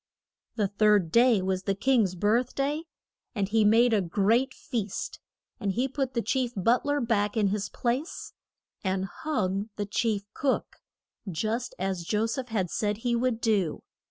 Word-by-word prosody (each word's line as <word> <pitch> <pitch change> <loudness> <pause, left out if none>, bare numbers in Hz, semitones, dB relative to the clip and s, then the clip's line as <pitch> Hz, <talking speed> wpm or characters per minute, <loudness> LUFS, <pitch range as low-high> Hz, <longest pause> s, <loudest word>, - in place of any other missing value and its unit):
The 210 -3 +1
third 205 -4 +3
day 235 -4 +5
was 190 0 0
the 195 - +1
king's 220 -4 +2
birth 225 +7 +1
day, 290 +4 -1 0.5
and 200 -3 0
he 220 +2 +3
made 225 +3 +5
a 210 - +3
great 210 +9 +2
feast. 215 -6 -4 0.4
And 200 -2 -1
he 250 +5 +1
put 270 -1 -3
the 235 - 0
chief 250 +2 0
but 230 +6 +2
ler 290 0 +1
back 225 -3 0
in 205 -2 +3
his 205 0 -2
place, 255 +8 -3 0.5
and 190 -1 0
hung 200 -5 -2
the 205 - -2
chief 210 0 0
cook; 270 -2 -1 0.5
just 220 +8 -2
as 190 -2 -2
Jo 210 +5 0
seph 245 +3 -3
had 195 -7 -1
said 210 -1 -1
he 235 +1 0
would 235 -1 0
do. 205 -7 +1
220 Hz, 165 wpm, -28 LUFS, 195-245 Hz, 0.5 s, day